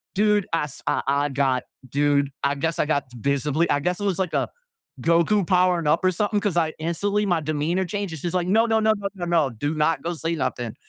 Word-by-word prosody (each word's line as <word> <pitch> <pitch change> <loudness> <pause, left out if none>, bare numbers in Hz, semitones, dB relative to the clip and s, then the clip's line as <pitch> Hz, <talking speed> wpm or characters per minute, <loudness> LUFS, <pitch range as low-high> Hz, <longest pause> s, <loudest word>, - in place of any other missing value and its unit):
dude, 210 -1 +2
I 165 - +2
s 150 -1 -7
I - - +1
I 140 +1 +1
got 135 -2 +1 0.3
dude, 140 +1 +1
I 140 0 +1
guess 165 +3 -2
I - - +3
got 145 -2 0
visibly 140 +6 0
I 145 - +2
guess 180 +4 -1
it 205 - -3
was 195 -2 0
like 185 -3 -1
a - - 0 0.5
Goku 170 +4 +2
powering 180 -2 +2
up 155 +5 +2
or 185 - +5
something, 205 +3 0
'cause 200 -4 -1
I 160 -2 +1
instantly, 200 +6 0
my 175 -4 +1
demeanor 155 +4 -1
changed. 200 -1 -3
And 160 - -7
she's 175 +3 -3
like, 180 -1 +1
"No, 225 +4 +4
no, 225 -1 +2
no, 220 0 +4
no, 200 -1 -3
no, 180 -3 -5
no. 165 -5 +2
Do 145 +6 -3
not 155 +1 +1
go 175 - -2
say 165 +1 -2
nothing." 120 -7 -3
165 Hz, 235 wpm, -24 LUFS, 145-190 Hz, 0.5 s, or